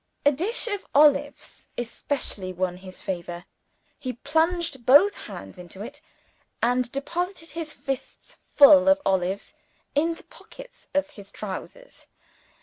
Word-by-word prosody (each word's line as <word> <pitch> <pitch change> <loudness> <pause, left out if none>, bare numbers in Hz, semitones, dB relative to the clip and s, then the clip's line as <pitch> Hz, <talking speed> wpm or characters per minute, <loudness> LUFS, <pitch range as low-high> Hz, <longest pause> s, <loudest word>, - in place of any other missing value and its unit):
A 290 - +7
dish 375 - 0
of 410 -4 -2
olives 285 -1 +3
especially 235 -5 -3
won 180 0 -2
his 185 0 -11
favor. 175 -1 -5 0.5
He 255 -1 -4
plunged 320 +1 0
both 290 - +6
hands - - -10
into 180 +3 -9
it, 285 +6 -10 0.6
and 245 +1 +1
deposited 340 +5 -4
his 330 -2 -5
fists 270 -1 -6 0.2
full 285 0 +8
of 285 0 +5
olives 190 +1 0 0.4
in 325 +3 +1
the - - -15
pockets - - -15
of 290 +1 +1
his 200 -7 -13
trousers. 215 - -8
280 Hz, 130 wpm, -25 LUFS, 200-320 Hz, 0.6 s, full